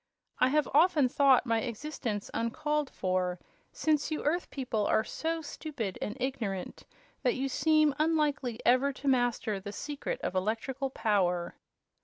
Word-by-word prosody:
I 255 - +5
have 300 +3 +2
often 305 -2 +5
thought 270 0 +4
my 230 -2 +2
existence 235 -4 -4
uncalled 295 +5 -1
for, 185 -1 -1 0.3
since 305 -2 +1
you 310 - -3
Earth 340 +4 0
people 240 -6 -1
are 220 - +3
so 325 +5 -3
stupid 285 - -5
and 210 - -3
ignorant 225 -8 -3 0.3
that 250 - +2
you 270 +1 -1
seem 310 +2 +3
unlikely 295 -7 +1
ever 255 +3 +4
to 280 - -7
master 245 -5 +1
the 200 +1 -7
secret 295 - -4
of - - -2
electrical 230 +8 -1
power." 190 -8 0
260 Hz, 145 wpm, -30 LUFS, 220-300 Hz, 0.3 s, I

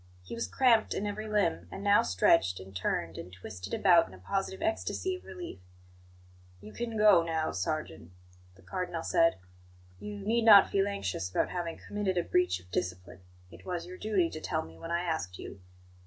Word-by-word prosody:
He - - -9
was 230 - -3
cramped 235 -4 +3
in 205 - -2
every 210 +1 -4
limb; 200 - 0
and 195 - -7
now 205 0 +5
stretched, 90 - +3
and 95 +1 -12
turned, 85 -2 -2
and 90 - -8
twisted 95 +1 -9
about 175 -4 +5
in 95 - -13
a - - -13
positive 190 - -3
ecstasy 335 +3 -1
of 365 - -11
relief. 355 - -8 1.0
"You 105 +2 -12
can 230 -2 -4
go 210 -5 +7
now, 160 -1 -1
sergeant," 90 - -4 0.5
the 95 - -20
Cardinal 170 - -4
said. 165 0 +3 0.6
"You 210 0 -7
need 220 +4 0
not 210 -3 +8
feel 195 0 +2
anxious 95 - -3
about - - 0
having 170 -2 -3
committed 205 -3 -3
a 175 - +2
breach 180 - +1
of 90 0 -20
discipline; 90 0 -4 0.3
it 85 +1 -14
was 175 -2 -4
your 180 +1 -9
duty 195 -6 +1
to 155 - -7
tell - - -1
me 80 0 -13
when 165 - -7
I 170 +1 0
asked 160 - -3
you. 95 - -9
170 Hz, 190 wpm, -30 LUFS, -, 1.0 s, not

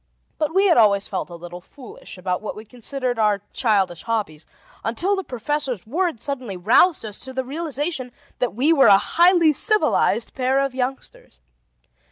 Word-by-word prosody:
But 305 -1 0
we 385 +4 +3
had 350 -8 +4
always 205 -3 +4
felt 190 - -4
a 175 - -9
little 175 +1 -10
foolish 250 -1 -12
about 180 0 -3
what 215 - -6
we 215 - -10
considered 250 +1 -3
our 210 -2 +1
childish 195 -8 0
hobbies, 205 -9 -3 0.4
until 345 - 0
the 385 - -4
professor's 260 - -3
words 315 - -2
suddenly 255 -9 -4
roused 230 - +3
us 210 -1 -5
to 260 0 -7
the 260 0 -2
realization 295 -2 -3 0.3
that 245 -4 -1
we 285 +8 +3
were 275 -6 +5
a 200 -2 +8
highly 340 - +4
civilized 425 +9 +1
pair 260 0 0
of 275 -1 0
youngsters. 255 - -5
250 Hz, 170 wpm, -22 LUFS, 210-295 Hz, 0.4 s, a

